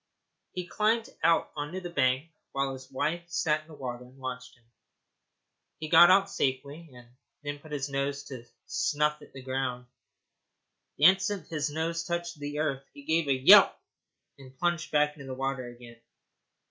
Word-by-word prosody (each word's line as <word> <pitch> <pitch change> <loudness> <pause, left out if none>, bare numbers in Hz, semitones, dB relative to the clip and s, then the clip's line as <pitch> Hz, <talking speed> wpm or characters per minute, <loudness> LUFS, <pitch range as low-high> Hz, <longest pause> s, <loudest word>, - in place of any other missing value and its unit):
He 180 -1 -4
climbed 220 +5 0
out 165 -1 +3
on 145 0 -4
the 185 0 -5
bank 135 -1 0 0.2
while 135 0 -1
his 130 0 -11
wife 165 +6 -2
sat 160 -3 +1
in 155 - -23
the 160 - -12
water 125 -3 -6
and 125 +2 -17
watched 130 -1 -7
him. 120 - -30 1.1
He 155 - -6
got 175 +1 +8
out 195 +1 +5
safely, 140 0 -3
and 125 -1 -15 0.4
then 145 0 -5
put 155 +1 -15
his 145 -1 -2
nose 140 0 -2
down 130 -3 -8
to 120 - -24 0.2
snuff 150 +1 0
at - - -15
the 135 -1 -11
ground. 130 -1 -3 1.1
The - - -3
instant 190 +1 +4
his 155 -2 -1
nose 165 +2 -2
touched 170 -1 -4
the 145 0 -5
earth 140 -3 -1
he 140 - -12
gave 160 +1 +1
a 140 - +3
yelp, - - +9 0.6
and 130 -1 -15
plunged 170 0 -1
back 150 0 +2
into 140 -2 -10
the 130 - -5
water 135 -1 -3
again. 120 -1 -13
145 Hz, 175 wpm, -28 LUFS, 130-165 Hz, 1.1 s, yelp